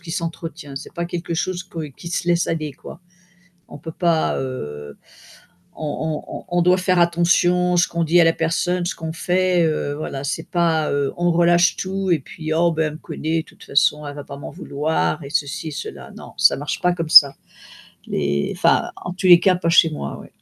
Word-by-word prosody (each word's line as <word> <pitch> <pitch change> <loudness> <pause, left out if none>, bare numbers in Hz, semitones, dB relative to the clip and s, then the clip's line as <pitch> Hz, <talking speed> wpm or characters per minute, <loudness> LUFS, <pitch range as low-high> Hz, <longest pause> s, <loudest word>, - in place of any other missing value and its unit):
qui 165 - -10
s'entretient, 165 -4 -6
c'est 145 - -8
pas 170 0 -3
quelque 170 -1 -4
chose 180 +2 -2
que 165 -4 -6
qui 140 +5 -14
se 175 0 -3
laisse 170 -1 +2
aller, 155 -3 -2
quoi. - - -12 0.7
On - - -9
peut 160 - -8
pas, 170 -1 +1
heu, 75 - -6 0.8
on 155 0 -3
on - - -7
on 175 - +4
doit 180 +1 +4
faire 185 -1 +2
attention, 175 +1 +2
ce 175 - +3
qu'on 170 -1 -1
dit 170 +2 +4
à - - +6
la 165 - +4
personne, 175 +2 -1
ce - - -2
qu'on 160 -1 -5
fait, 180 0 +1
heu, 155 -2 -1
voilà, 140 -2 -5
c'est 155 +3 -4
pas, 165 -3 +1
heu, 140 -1 0
on 175 0 +1
relâche 175 +2 +4
tout 190 0 -3
et 155 - +2
puis: 155 +3 -6
«Oh 170 +1 +3
bah, 160 0 0
elle 150 - -2
me - - -9
connaît, 160 0 -3
de - - -30
toute - - -17
façon, 150 +1 +1
elle 145 - -7
va 145 - -6
pas 140 - -9
m'en - - -8
vouloir» 150 - -2
et 140 - -9
ceci 150 +1 -2
cela, 150 - -8
non, - - -11
ça - - +5
marche 145 +2 -4
pas 180 0 +2
comme 165 -2 -4
ça. 140 -2 +9 0.7
Les 70 -1 -1
enfin, - - +2
en 180 - -6
tous 185 - -2
les 175 -1 +9
cas, 190 - +4
pas 175 -2 -2
chez 165 -1 +5
moi, 70 - -6
oui. - - -14
165 Hz, 215 wpm, -21 LUFS, 150-175 Hz, 0.8 s, ça